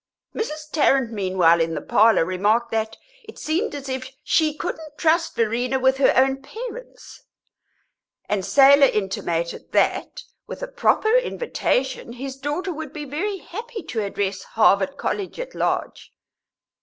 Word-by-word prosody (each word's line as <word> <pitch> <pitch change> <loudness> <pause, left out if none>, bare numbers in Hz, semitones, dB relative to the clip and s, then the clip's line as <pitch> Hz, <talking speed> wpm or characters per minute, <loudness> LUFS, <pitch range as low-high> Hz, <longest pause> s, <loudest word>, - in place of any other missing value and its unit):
Mrs. 305 -8 -5
Tarrant, 270 -5 +2
meanwhile, 185 -5 +3
in 165 0 -1
the - - -2
parlour, 220 -5 +4
remarked 210 +6 +1
that 220 0 -2 0.3
it 440 0 -13
seemed 335 +6 -1
as 280 -1 -7
if 260 0 -4
she 310 0 +2
couldn't 310 -2 -6
trust 330 +1 +1
Verena 240 +3 0
with 265 +1 +2
her 270 - +4
own 270 +1 +3
parents; - - -9 1.1
and 205 -2 -1
Selah 280 +4 +6
intimated 175 -6 -3
that, - - 0 0.2
with - - -7
a - - -3
proper 470 -2 +2
invitation, 265 - -1
his 265 +2 -6
daughter 295 +7 -3
would 310 -2 -7
be 295 -1 -6
very 370 +9 -3
happy 445 +5 -8
to 220 -3 -3
address 195 -1 -2
Harvard 215 +3 +2
College 400 +2 -3
at - - -6
large. - - -2
270 Hz, 145 wpm, -22 LUFS, 220-320 Hz, 1.1 s, Selah